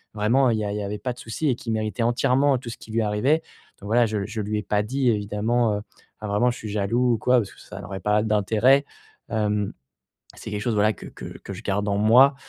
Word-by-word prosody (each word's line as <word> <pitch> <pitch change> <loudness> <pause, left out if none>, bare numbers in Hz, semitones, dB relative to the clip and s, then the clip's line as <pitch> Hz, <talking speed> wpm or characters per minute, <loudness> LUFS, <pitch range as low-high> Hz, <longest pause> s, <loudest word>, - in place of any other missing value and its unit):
«Vraiment, 120 +5 +3
il 115 - +1
y - - -2
a 100 - -2
il 105 - -3
y 105 - -3
avait 100 +1 -4
pas 125 +4 -2
de 125 - -16
souci 125 +6 -2
et 125 - +2
qu'il 115 -1 -4
méritait 110 +2 -2
entièrement 130 +3 +3
tout 120 -1 -8
ce 115 - -7
qui - - -14
lui 115 +1 +1
arrivait» 110 +9 +1 0.4
donc 100 - -8
voilà, 120 +2 +4
je 105 -3 -2
je 110 +2 -5
lui 105 +1 -2
ai - - -5
pas 105 0 +1
dit 130 +3 0
évidemment, 110 +2 +1
heu 105 - -3 0.4
enfin 105 - -4
vraiment: 115 +5 +2
«Je 120 - -7
suis 110 - -7
jaloux.» 115 +5 +1
ou - - -3
quoi 125 +3 +3
parce 105 -4 -4
que - - -19
ça - - -9
n'aurait 95 0 -6
pas 105 0 +2
d'intérêt, 110 +6 +3 0.4
hem, 105 -2 0 0.6
c'est - - -8
quelque 105 - -2
chose 115 +1 0
voilà 105 +1 +3
que - - -11
que - - -9
que - - -9
je - - -8
garde 100 +1 -1
en 100 0 +1
moi, 125 +7 +6
110 Hz, 260 wpm, -24 LUFS, 105-120 Hz, 0.6 s, moi